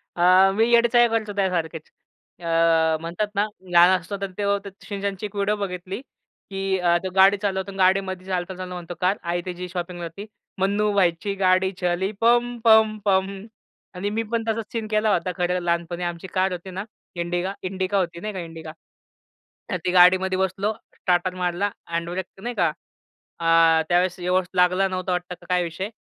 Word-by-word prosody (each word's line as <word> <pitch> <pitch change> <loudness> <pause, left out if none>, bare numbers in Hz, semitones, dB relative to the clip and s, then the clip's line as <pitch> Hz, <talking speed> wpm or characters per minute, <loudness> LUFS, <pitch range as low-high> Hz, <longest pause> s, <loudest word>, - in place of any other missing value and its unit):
अ, 185 +2 +5
मी 225 +2 +3
येडे 235 0 +6
चाळे 240 0 +6
करतो 220 -2 -1
त्यासारखेच. 170 -5 -2 0.5
अ, 165 -1 +2
म्हणतात 170 +6 -2
ना 200 +1 +2 0.3
लहान 180 +2 +6
असतो, 195 +4 -6
तर 195 -1 -3
तेव्हा 200 0 +1
ते - - -5 0.2
शिनचॅनची 200 -1 -4
एक 205 0 -8
व्हिडिओ 205 +1 +1
बघितली 190 +1 -5 0.5
की 195 0 -1
अ, 175 -1 +3
तो 190 - -2
गाडी 195 +1 +6
चालवतो. 195 -1 -2
अ, - - -12
गाडीमध्ये 190 0 +1
चालता-चालता 185 0 -4
म्हणतो, 175 -1 -7
कार 185 +3 +2
आई 175 - -1
त्याची 180 0 -5
शॉपिंगला 175 -1 -5
जाती. 195 +5 -9 0.3
मन्नू 205 +2 +1
भाईची 185 0 +1
गाडी 185 0 +3
चली 180 +2 0
पम, 240 +1 +3
पम, 220 -1 +5
पम. 195 0 0 0.5
आणि 190 +3 -2
मी 225 - 0
पण 230 -1 0
तसा 225 0 0
सीन 225 -2 -3
केला 215 0 +1
होता 180 +1 0
खरं, 180 0 0
लहानपणी 170 0 -2
आमची 175 +1 -4
कार 190 0 +1
होती 180 +1 -6
ना 190 +2 -4 0.3
इंडिगा 175 +2 -2
इंडिका 190 +1 -1
होती 170 -3 -1
नाही 215 +4 -5
का 190 - -5
इंडिका. 165 -2 -8 1.0
तर 185 - 0
ती - - +1
गाडीमध्ये 185 +1 +5
बसलो, 190 +3 0 0.2
स्टार्टर 180 0 0
मारला, 180 +2 -1 0.2
हँडब्रेक 170 +2 -3 0.2
नाही 240 +2 -4
का, 175 -6 +2 0.7
अ, 165 -1 +4
त्यावेळेस 180 +1 +2
व्यवस्थित 180 +1 -1
लागला 180 +2 +3
नव्हता 185 0 -3
वाटतं 180 0 -3
का - - -16
काय 180 -1 +2
विषय 170 +4 -4
185 Hz, 175 wpm, -23 LUFS, 175-200 Hz, 1.0 s, येडे